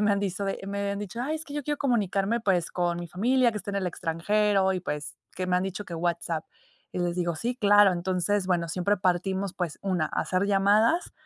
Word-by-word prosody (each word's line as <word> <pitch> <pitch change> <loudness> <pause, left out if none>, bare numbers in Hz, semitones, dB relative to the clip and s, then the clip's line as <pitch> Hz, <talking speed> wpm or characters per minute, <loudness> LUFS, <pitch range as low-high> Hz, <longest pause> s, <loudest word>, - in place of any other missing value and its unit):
me 210 0 +3
han 200 - 0
dice 200 0 -2
de 195 - -2
me 200 0 -3
habían 200 0 -2
dicho: 210 +3 -5
"Ay 295 +5 -1
es 315 - -5
que 285 - -11
yo 295 0 -3
quiero 295 +2 -2
comunicarme 230 -4 +1
pues 185 -5 +1
con 175 -1 -1
mi 175 - -5
familia 240 +8 +2
que 210 - -3
está 200 - -6
en 200 - -3
el 190 - -1
extranjero, 190 +4 +1
y 185 - -2
pues, 150 -4 -4 0.2
que 185 0 -3
me 180 - +1
han 180 - +1
dicho 195 +2 -4
que 175 - -7
WhatsApp". 165 -1 -2 0.5
Y - - -3
les 175 -1 0
digo: 175 -2 -1
"Sí, 240 +9 -2
claro". 205 -3 +6
Entonces, 185 +2 0
bueno, 170 -2 +1
siempre 185 +4 +1
partimos, 190 +1 0
pues 175 -4 -4
una, 180 -5 0
hacer 185 +5 -1
llamadas, 205 - +3
195 Hz, 230 wpm, -27 LUFS, 175-205 Hz, 0.5 s, claro